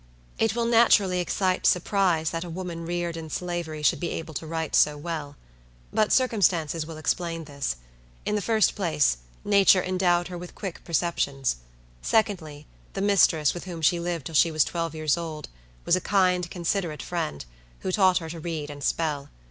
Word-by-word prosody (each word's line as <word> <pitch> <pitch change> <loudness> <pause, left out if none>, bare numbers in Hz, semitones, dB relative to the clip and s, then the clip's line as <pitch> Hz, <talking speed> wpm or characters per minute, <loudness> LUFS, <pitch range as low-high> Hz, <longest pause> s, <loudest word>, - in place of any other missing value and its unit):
It 225 -1 +2
will 235 -1 0
naturally 220 -6 +4
excite 185 +1 0
surprise 180 -3 +2
that 165 0 -3
a 175 - -7
woman 170 -1 -5
reared 175 -1 -2
in 160 -1 -7
Slavery 170 -2 -4
should - - +3
be 175 - -2
able 160 -1 -5
to 160 - -5
write 160 -1 -2
so 150 0 +4
well. 150 -2 -5 0.6
But 215 -1 +2
circumstances 175 - +2
will 165 -1 -8
explain 165 +1 -2
this. 140 - -3 0.5
In - - -1
the 210 - 0
first 220 +1 +2
place, 155 - +1 0.3
nature 200 -2 +5
endowed 180 -1 +1
her 175 -1 -6
with 175 0 -10
quick 190 -5 -6
perceptions. 140 - 0 0.4
Secondly, 165 -9 0 0.3
the 195 - -3
mistress, 185 -7 +4
with 175 - -7
whom 170 -3 -7
she 170 +3 +4
lived 170 -4 -3
till 165 - -6
she 165 +2 +5
was 155 -2 +3
twelve 165 -2 -3
years 155 0 +1
old, 160 -3 -6 0.4
was 170 - +4
a 185 - -1
kind, 180 -3 +2
considerate 170 -2 -2
friend, 155 - -3 0.4
who 185 - -2
taught 185 -2 +4
her 165 -3 -4
to 165 - -7
read 155 -3 -4
and 145 -1 -9
spell. 145 -3 -1
170 Hz, 180 wpm, -26 LUFS, 155-185 Hz, 0.6 s, nature